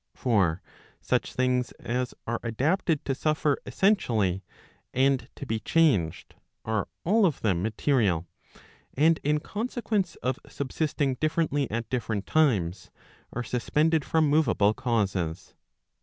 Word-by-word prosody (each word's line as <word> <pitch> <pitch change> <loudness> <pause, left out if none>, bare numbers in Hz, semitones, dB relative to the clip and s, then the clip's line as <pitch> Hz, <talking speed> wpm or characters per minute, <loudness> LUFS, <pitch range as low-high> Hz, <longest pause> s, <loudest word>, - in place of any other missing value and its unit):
For 95 -8 +1 0.4
such - - -1
things 125 -1 +1
as 125 +1 -3
are 115 0 -2
adapted 150 - 0
to 135 - 0
suffer 150 0 0
essentially, 110 - +1 0.5
and 135 -1 +2
to - - -7
be 110 -3 -2
changed, 115 - +1 0.3
are 110 -2 -1 0.2
all 215 +6 +3
of 155 - -3
them 95 -6 +1
material, 105 - +1 0.7
and 160 +4 +4
in 150 +1 +2
consequence 215 -2 -2
of 130 0 -1
subsisting 140 -1 -1
differently 155 -3 +1
at 115 +1 -3
different 110 -5 -2
times, 105 - +1 0.4
are 125 - -3
suspended 150 +6 +1
from 160 +1 +2
moveable 130 -9 +3
causes. 100 -10 -1
130 Hz, 120 wpm, -27 LUFS, 110-155 Hz, 0.7 s, and